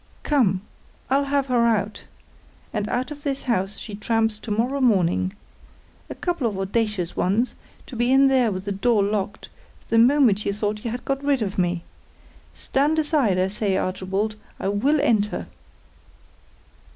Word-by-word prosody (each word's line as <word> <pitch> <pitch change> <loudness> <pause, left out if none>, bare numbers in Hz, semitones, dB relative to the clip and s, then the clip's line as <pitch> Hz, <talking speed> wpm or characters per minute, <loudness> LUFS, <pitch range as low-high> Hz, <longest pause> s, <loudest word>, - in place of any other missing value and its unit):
"Come; 215 -11 +2 0.5
I'll 280 +1 +3
have 280 -1 +1
her 245 -3 +2
out. 210 -2 -1 0.7
And 210 -1 -2
out 255 +4 -2
of 290 -1 -8
this 275 -2 -3
house 200 -5 -1
she 215 - -8
tramps 225 +1 0
to 230 - -9
morrow 245 +6 0
morning. 190 -5 +2 0.8
A - - -6
couple 345 -9 -1
of 205 -4 -3
audacious 195 -2 -1
ones, 215 +7 +1 0.3
to 260 - -10
be 240 +2 +1
in 270 +1 +6
there 255 -4 +3
with 185 0 -5
the 205 - -2
door 205 +1 +2
locked, 205 0 -2 0.4
the 225 - +4
moment 240 -4 +4
you 200 - -1
thought 210 0 -2
you 235 - -2
had 245 +2 -5
got 275 0 -2
rid 280 -4 +2
of 195 -2 -3
me! 175 -1 0 0.7
Stand 290 +4 0
aside, 295 - +2
I 185 +1 +2
say, 195 -1 -1
Archibald, 195 +4 -2 0.2
I 195 - -1
will 270 +10 +2
enter." 210 -4 +1
220 Hz, 165 wpm, -23 LUFS, 200-265 Hz, 0.8 s, in